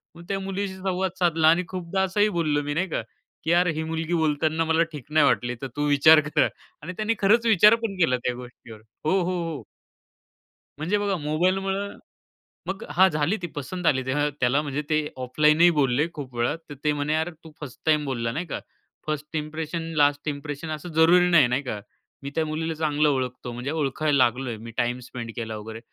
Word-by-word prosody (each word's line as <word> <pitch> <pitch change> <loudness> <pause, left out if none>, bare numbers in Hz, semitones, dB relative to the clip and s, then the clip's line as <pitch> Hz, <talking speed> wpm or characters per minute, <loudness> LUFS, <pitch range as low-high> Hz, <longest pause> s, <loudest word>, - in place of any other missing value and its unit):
मग 170 - -12
त्या 195 -1 -1
मुलीशी 195 0 -3
संवाद 190 0 -2
साधला 165 -3 +3
आणि 170 +3 +5
खूपदा 185 +1 -3
असंही 205 +3 +2
बोललो 150 -3 +1
मी, 145 0 -3
नाही 180 +5 0
का, - - -1 0.4
की 160 - 0
"यार 175 +1 +4
ही 160 - -1
मुलगी 160 +1 -3
बोलताना 160 0 +1
मला 160 +1 +3
ठीक 150 -5 -8
नाही 155 -1 +5
वाटली. 125 -2 +1
तर 135 - -3
तू 145 0 0
विचार" 155 +2 +7
"कर." - - +3 0.3
आणि 175 +5 -6
त्याने 215 +1 +1
खरचं 225 +3 +4
विचार 210 +2 +7
पण 195 -4 -3
केला 130 -7 +3
त्या 125 - -1
गोष्टीवर 120 -2 -11 0.3
हो, 190 +5 +3
हो, 180 0 -1
हो. 155 -7 -5 1.2
म्हणजे 180 +7 0
बघा 200 -2 0
मोबाईलमुळं. 190 +6 -1 0.7
मग 190 0 -4
हां, 185 +6 +6
झाली 150 +5 0
ती 175 - -3
पसंत 180 +6 -5
आली. 130 -2 +3
तेव्हा 145 +3 +1
त्याला 130 +4 +2
म्हणजे 145 0 -3
ते 155 -1 +1 0.2
ऑफलाईनही 150 +6 +4
बोलले 145 0 +2
खूप 135 -5 -8
वेळा. 120 +6 0
तर - - -6
ते 150 - +3
म्हणे, 145 +1 -1
"यार, 160 +2 0
तू 160 - -12
फर्स्ट 145 -5 -9
टाईम 150 -2 +3
बोलला, 115 -3 -2
नाही 165 +8 -3
का? - - -4 0.5
फर्स्ट 150 +1 -4
इम्प्रेशन 155 +2 -4
लास्ट 145 0 +2
इंप्रेशन 145 +2 -5
असं 155 +3 -5
जरुरी 175 +3 +5
नाही, 165 -7 +6
नाही 125 +3 0
का? 110 -6 -4 0.4
मी 140 - -4
त्या 160 - +1
मुलीला 160 +1 -2
चांगलं 150 -1 +1
ओळखतो, 125 -2 -2
म्हणजे 125 +4 -4
ओळखायला 150 -1 0
लागलोय. 120 -1 -1
मी 115 +2 -9
टाईम 120 +1 0
स्पेंड 115 -2 -6
केला 110 -2 -4
वगैरे." 110 +1 -8
155 Hz, 195 wpm, -25 LUFS, 140-175 Hz, 1.2 s, विचार